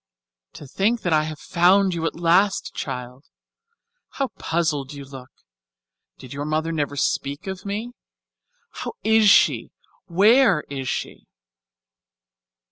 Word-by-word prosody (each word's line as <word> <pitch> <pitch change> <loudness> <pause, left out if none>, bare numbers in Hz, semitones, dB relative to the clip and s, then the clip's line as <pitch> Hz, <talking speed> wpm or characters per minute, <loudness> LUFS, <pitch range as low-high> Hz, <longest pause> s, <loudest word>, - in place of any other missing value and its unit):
"To 150 - -11
think 205 - 0
that 175 - 0
I 155 0 +3
have 155 -1 -6
found 185 +4 +3
you 165 -1 -2
at - - -4
last, 180 +4 +2
child. 125 +2 -6 0.9
How 275 -2 -2
puzzled 155 -4 -2
you 140 -1 -9
look. 130 -1 -11 0.9
Did 130 - -11
your 140 +1 -4
mother 155 +2 -1
never 145 -3 -2
speak 140 +4 -2
of 190 0 -6
me? 215 +4 -4 0.8
How - - -6
is 220 -1 +4
she? 200 - +3 0.3
Where 200 - +4
is 135 -2 -4
she?" - - -5
165 Hz, 125 wpm, -22 LUFS, 145-200 Hz, 0.9 s, is